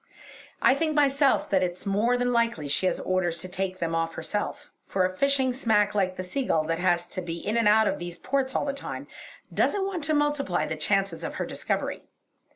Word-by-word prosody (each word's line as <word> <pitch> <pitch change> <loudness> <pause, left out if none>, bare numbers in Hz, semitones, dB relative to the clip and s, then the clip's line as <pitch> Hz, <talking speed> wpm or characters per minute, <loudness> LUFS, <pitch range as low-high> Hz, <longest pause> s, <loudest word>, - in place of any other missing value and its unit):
I - - +7
think 310 +2 0
myself 280 -1 +3
that 190 -2 +4
it's 180 0 -3
more 215 +5 +2
than 245 0 0
likely 230 -11 +1
she 150 +6 +1
has - - 0
orders 180 -2 0
to 185 - -6
take 185 0 -3
them 165 -2 -2
off 165 0 -1
herself, 205 - -4
for 185 -1 0
a 185 0 -2
fishing 270 +2 +2
smack 210 -5 +2
like 190 -3 +1
the 185 - -3
Seagull 180 - 0
that 165 +1 -2
has 175 -1 +2
to 185 - -5
be 170 -1 -4
in 210 +6 -2
and 230 -2 +3
out 215 +1 +5
of - - -1
these 175 0 -6
ports 265 +6 -1
all - - +1
the 280 - -1
time, 280 - -6 0.5
doesn't 400 -2 +1
want 375 -5 -3
to 310 +1 +1
multiply 295 -11 +1
the 160 - -3
chances 195 +5 0
of - - -4
her - - -2
discovery. - - -3
205 Hz, 215 wpm, -27 LUFS, 180-265 Hz, 0.5 s, I